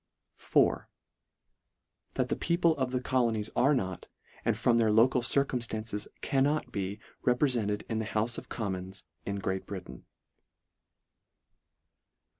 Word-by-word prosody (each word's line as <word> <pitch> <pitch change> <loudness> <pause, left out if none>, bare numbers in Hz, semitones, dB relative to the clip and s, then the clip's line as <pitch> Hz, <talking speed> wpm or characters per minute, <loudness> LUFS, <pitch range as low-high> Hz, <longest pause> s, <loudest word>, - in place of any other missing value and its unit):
IV. - - +3 0.6
" - - -52
That - - 0
the - - +1
people 170 -1 +2
of 130 -2 0
the 125 0 -1
colonies 115 -5 0
are 140 +3 +4
not, 95 -7 -3 0.4
and - - +1
from 120 -1 +3
their 110 -2 +3
local 120 +4 +4
circumStances 115 -5 0
cannot 140 -1 +1
be 100 -1 -3 0.2
reprefented 125 -5 +1
in 110 - -1
the 110 - -2
Houfe 115 +2 -1
of - - -15
Com 105 -4 -2
mons, 95 +1 -4 0.2
in 100 - -1
Great 95 -1 -3
Britain." 95 -3 -8
115 Hz, 130 wpm, -30 LUFS, 105-130 Hz, 0.6 s, are